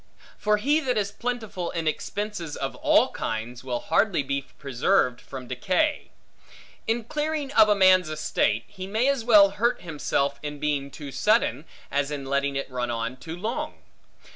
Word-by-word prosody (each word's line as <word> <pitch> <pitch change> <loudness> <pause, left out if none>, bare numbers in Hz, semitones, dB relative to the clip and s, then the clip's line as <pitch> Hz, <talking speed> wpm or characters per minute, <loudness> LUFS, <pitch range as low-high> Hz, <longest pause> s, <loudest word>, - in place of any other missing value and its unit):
For 210 0 +2
he 285 +9 +2
that 255 -6 -1
is 200 -1 0
plentiful 220 -6 -4
in 165 -2 -3
expenses 175 0 -3
of - - -3
all - - +4
kinds, 115 +2 -4
will 125 -2 -3
hardly 200 -8 +2
be 140 0 -3
preserved 130 -1 +1
from 130 -2 -8
decay. 185 - 0 0.8
In 230 +1 0
clearing 300 +3 -2
of 220 -5 +6
a 210 - +5
man's 185 -3 +5
estate, 155 -7 0
he 190 -2 -8
may 220 +6 +1
as 275 -4 0
well 210 -4 +7
hurt 235 +4 0
himself 140 -3 -1
in 150 0 -5
being 145 -2 -1
too 140 0 -8
sudden, 150 - +2 0.3
as 140 0 0
in 145 -2 -4
letting 140 +1 0
it 140 - -2
run 125 -1 -2
on 115 +1 -2
too 160 +6 -7
long. 270 +11 -3
170 Hz, 165 wpm, -26 LUFS, 140-215 Hz, 0.8 s, well